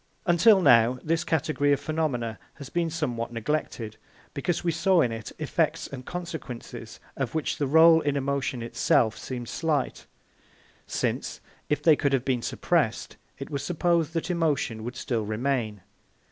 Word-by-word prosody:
Until 190 +3 +5
now 120 -1 +5
this 165 +1 0
category 155 -2 +1
of 140 - +3
phenomena 135 -8 -2 0.2
has 140 -2 -9
been 170 -1 0
somewhat 120 -8 -3
neglected, 115 -3 -3 0.4
because 170 +4 -2
we 170 - +1
saw 175 +2 +3
in 120 - +1
it 115 -2 -6
effects - - 0
and 130 -2 -8
consequences 130 -9 -7 0.2
of 135 0 -3
which 160 - -1
the 145 - +1
rôle 160 +3 +7
in 145 -1 0
emotion 140 -3 -1
itself 115 -1 +2
seemed 120 -2 -6
slight, 155 -2 -2 0.8
since, - - -2 0.3
if 150 - 0
they 160 -2 +7
could 140 -2 0
have 130 -1 +1
been 125 -3 0
suppressed, - - -1 0.2
it 135 - -8
was 140 -2 -3
supposed 170 -2 +1
that 165 +2 -2
emotion 145 -10 0
would 120 +2 -5
still 115 -4 -2
remain. 110 -1 -2
140 Hz, 155 wpm, -26 LUFS, 120-160 Hz, 0.8 s, rôle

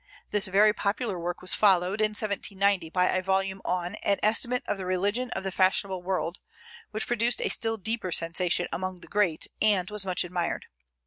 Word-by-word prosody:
This 210 0 +3
very 205 +3 +4
popular 205 -1 -2
work 175 +1 -4
was 185 - +2
followed, 195 0 +3
in 215 0 +2
1790, 200 -4 +1
by 180 +2 +2
a 185 - 0
volume 190 0 -1
on 180 +1 -2
an 200 - +2
"Estimate 240 +3 +2
of 200 - -2
the 190 - -4
Religion 205 +7 0
of - - -3
the 190 - -3
Fashionable 190 0 +1
World," 180 -1 -2 0.5
which 215 0 -3
produced 240 0 0
a - - 0
still 225 -1 0
deeper 220 -2 -2
sensation 170 +1 +1
among 185 0 -4
the - - -13
great, 190 -6 +1 0.2
and 205 -3 +3
was 210 -1 -1
much 185 -2 +1
admired. 180 -1 -3
195 Hz, 185 wpm, -27 LUFS, 180-210 Hz, 0.5 s, very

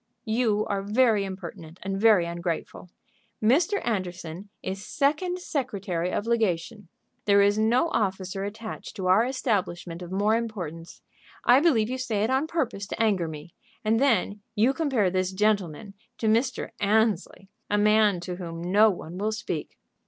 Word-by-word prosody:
"You 220 -2 +1
are 200 -1 -1
very 215 0 +2
impertinent 170 -3 -8
and 195 +1 -3
very 215 -6 +5
ungrateful. 170 +1 -4 0.5
Mr. 330 - +3
Anderson 185 -3 -4
is 190 +1 -4
second 310 - 0
secretary 200 - -2
of 205 - -2
legation. 215 -2 -1 0.4
There 200 -1 +5
is 205 +1 +3
no 235 +9 +3
officer 195 - -1
attached 215 +2 -7
to 190 -4 -4
our 185 +5 +5
establishment 185 -9 -2
of 175 0 -8
more 205 +3 +2
importance. 180 -8 -5 0.4
I 245 +2 +7
believe 270 -9 +3
you 255 +2 -3
say 225 -5 -1
it 225 - 0
on 270 +4 +1
purpose 255 -12 -2
to - - -6
anger 200 -7 +2
me. 155 +2 -9 0.3
And 225 +1 +3
then 215 -6 +1
you 230 +5 +3
compare 265 - +1
this 185 0 0
gentleman 200 -2 0 0.2
to - - -4
Mr. 235 +4 +1
Annesley, 205 -2 +1 0.2
a 205 - +2
man 210 -2 +4
to 180 0 -5
whom 165 -2 -6
no 205 +5 +5
one 180 -2 -6
will 215 +2 0
speak." 215 - -5
205 Hz, 155 wpm, -26 LUFS, 185-230 Hz, 0.5 s, I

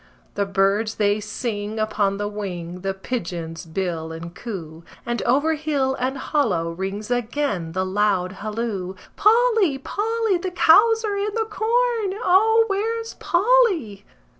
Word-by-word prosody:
The 200 -1 -1
birds 195 +3 +1
they 205 0 +2
sing 210 0 -4
upon 210 -2 0
the 205 0 -2
wing, 180 -4 -5
the 195 0 -2
pigeons 170 -6 -5
bill 165 -2 -3
and 165 +1 -8
coo, 170 -9 -7 0.2
And 240 0 -2
over 290 +6 +3
hill 290 -4 0
and 260 +2 -1
hollow 220 - 0
rings 195 +6 -5
again 240 - -1
the 185 +1 0
loud 190 -2 +1
halloo: 205 -2 -4 0.2
"Polly! 445 - +4
Polly! 435 +5 -1
The 370 - -3
cows 445 +7 +5
are 405 -1 -1
in 405 +1 -2
the 450 -1 0
corn! 445 -1 0
O, 445 +3 +4
where's 455 +3 -2
Polly?" 390 - +2
230 Hz, 140 wpm, -22 LUFS, -, 0.2 s, cows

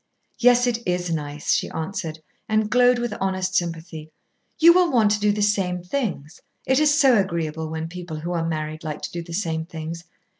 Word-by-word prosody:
"Yes. 245 0 +5
It 240 -2 0
is 180 -1 -1
nice," 150 -2 -3
she - - 0
answered, 160 -1 -4 0.3
and 215 -1 +1
glowed 250 0 +5
with 240 -2 -2
honest 190 -1 -1
sympathy. 165 -3 -3 0.5
"You 335 +1 +8
will 360 -1 +3
want 220 -5 +3
to 210 - +1
do 210 0 +3
the 205 0 0
same 185 -4 0
things. 180 - -4 0.2
It 265 +1 +3
is 300 0 +3
so 260 -7 +5
agreeable 160 -4 -2
when 160 0 -4
people 170 -2 -7
who 170 +2 -4
are 170 -2 -1
married 155 -1 -4
like 155 -2 -5
to - - -4
do 170 - -4
the 170 0 -9
same 160 -4 -1
things. 165 +1 -7
180 Hz, 195 wpm, -23 LUFS, 160-220 Hz, 0.5 s, You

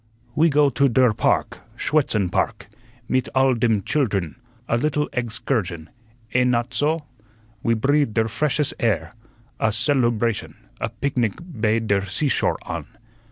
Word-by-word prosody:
"We 160 +2 +4
go 145 -1 +4
to 140 +2 +3
der 125 -1 +4
park, - - 0 0.2
Schuetzen 110 - +1
Park, - - -1 0.4
mit 130 -1 0
alle 130 0 +4
dem 115 -3 +1
childern, 100 - 0 0.3
a - - +1
little 150 +4 0
eggs 120 -2 -2
kursion, 90 - -2 0.4
eh 125 - +4
not 125 0 +1
soh? 150 +5 0 0.6
We 115 - +2
breathe 140 0 +1
der 110 -1 +2
freshes 150 +5 0
air, 95 -8 0 0.5
a - - +2
celubration, 120 -2 0 0.2
a - - -2
pignic 125 -7 -1
bei 115 -11 -1
der 100 -3 +1
seashore 130 +9 0
on. - - -5
120 Hz, 140 wpm, -23 LUFS, 110-140 Hz, 0.6 s, We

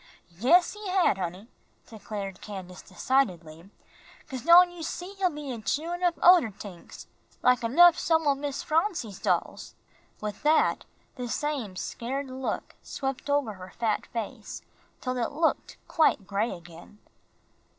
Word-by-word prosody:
"Yes, 340 - +4
he 420 -1 -8
had, 365 - +2
honey," 185 +4 -5 0.4
declared 205 -4 -7
Candace, 190 -3 -8
decidedly, 180 -6 -1 0.6
"'cause 260 -3 -6
don' 350 +5 +7
you 350 -1 -10
see, 355 +4 -5
he'll 370 -2 +3
be 295 -4 -6
a 235 -3 -6
chewin' 335 +9 -2
up 350 -2 +2
oder 350 -9 +7
tings, 195 -3 -11 0.4
like 250 -1 +4
enough 335 +9 +6
some 320 -1 +2
o' 285 - +4
Miss 280 0 -4
Phronsie's 315 - -1
dolls." - - -2 0.4
With 210 -1 -5
that 310 +1 +2 0.3
the 250 -1 -4
same 255 -6 -3
scared 260 +7 -4
look 260 0 -4
swept 270 +1 -5
over 285 -6 +1
her 185 -1 -12
fat 225 -2 -1
face, 230 -3 -6 0.4
till 255 -1 -2
it 240 +3 -2
looked 320 +2 0
quite 310 - +2
gray 205 +4 -1
again. 170 +3 -11
255 Hz, 140 wpm, -27 LUFS, 205-320 Hz, 0.6 s, don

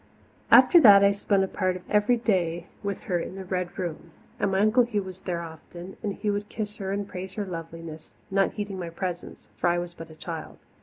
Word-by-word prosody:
After 345 - +8
that 200 -6 +9
I 200 - +6
spent 200 -1 +1
a - - 0
part 185 -1 -1
of 180 - -10
every 210 +4 +3
day 175 -7 0 0.2
with 200 -2 -3
her 175 -2 -1
in 175 - -6
the 190 -1 -7
Red 180 -1 -3
Room. 170 -3 -5 0.3
And 200 - +1
my 190 - +1
Uncle 215 +4 +5
Hugh 225 -4 0
was 185 -1 -9
there 175 -2 -3
often, 170 +3 -10
and 200 -3 -3
he 210 - -1
would 205 0 -3
kiss 210 -1 -5
her 195 -2 -4
and 200 0 -2
praise 185 0 -7
her 210 - -2
loveliness, 165 -2 -8 0.2
not 195 0 +2
heeding 205 -2 -5
my 170 -2 -4
presence 175 +1 -5
for - - +1
I 175 0 +3
was 175 0 -4
but 165 -1 -10
a 160 - -13
child. 165 0 -7
190 Hz, 225 wpm, -26 LUFS, 175-205 Hz, 0.3 s, that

